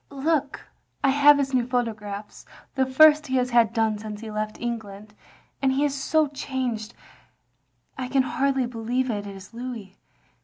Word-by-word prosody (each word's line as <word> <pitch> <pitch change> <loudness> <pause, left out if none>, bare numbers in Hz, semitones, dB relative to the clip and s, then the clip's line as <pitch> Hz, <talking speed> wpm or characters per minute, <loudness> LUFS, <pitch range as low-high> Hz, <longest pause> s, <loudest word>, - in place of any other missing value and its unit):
"Look 285 0 -1 0.2
— - - -44
I 275 - +4
have 290 +1 +6
his 270 -1 -1
new 245 -2 +1
photographs; 215 -5 -4 0.3
the 265 -1 +1
first 300 +3 +6
he 260 - -1
has 250 -1 +1
had 235 -2 +4
done 220 -2 0
since 210 0 -7
he 220 -1 -7
left 215 0 -4
England. 215 -3 -6 0.5
And 270 -1 +3
he 280 +2 +2
is 285 - 0
so 310 +3 +1
changed 255 -6 -4 1.0
I 255 - -3
can 265 +1 +2
hardly 265 0 0
believe 240 +2 -2
it 205 -1 -4
is 195 +2 -11
Louis. 230 -5 -7
250 Hz, 165 wpm, -25 LUFS, 220-270 Hz, 1.0 s, have